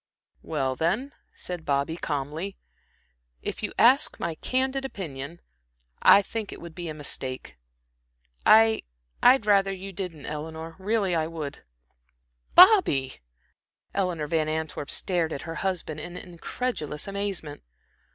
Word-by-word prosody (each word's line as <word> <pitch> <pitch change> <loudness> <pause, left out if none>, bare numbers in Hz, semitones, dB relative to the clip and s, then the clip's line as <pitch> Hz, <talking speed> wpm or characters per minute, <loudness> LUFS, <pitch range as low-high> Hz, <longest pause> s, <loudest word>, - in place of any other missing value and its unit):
"Well, 135 -4 -1
then," 205 - -1 0.2
said 180 -2 -6
Bobby, 140 +2 0
calmly, 155 +5 -4 0.9
"if - - -4
you - - -2
ask 260 +6 +5
my 170 - -2
candid 260 +9 -1
opinion, 165 - -6 0.6
I 200 - +8
think 220 0 -5
it - - -8
would 170 -1 -10
be 175 -2 -6
a - - -4
mistake. 130 - -5 0.9
I 220 0 +6 0.4
I'd 250 -2 +6
rather 195 -2 +4
you 195 +1 -7
didn't 180 -6 -6
Eleanor, 160 +2 -6
really 200 -1 0
I 160 -2 +1
would." 155 -4 -6 0.9
"Bobby," 360 - +6 0.7
Eleanor 180 -6 -1
Van 155 0 0
Antwerp 155 -2 -3
stared 175 -4 +1
at 140 - -5
her 165 - -5
husband 180 -5 -2
in 175 +3 -7
incredulous 170 - -4
amazement. 200 -7 -4
170 Hz, 125 wpm, -26 LUFS, 155-200 Hz, 0.9 s, I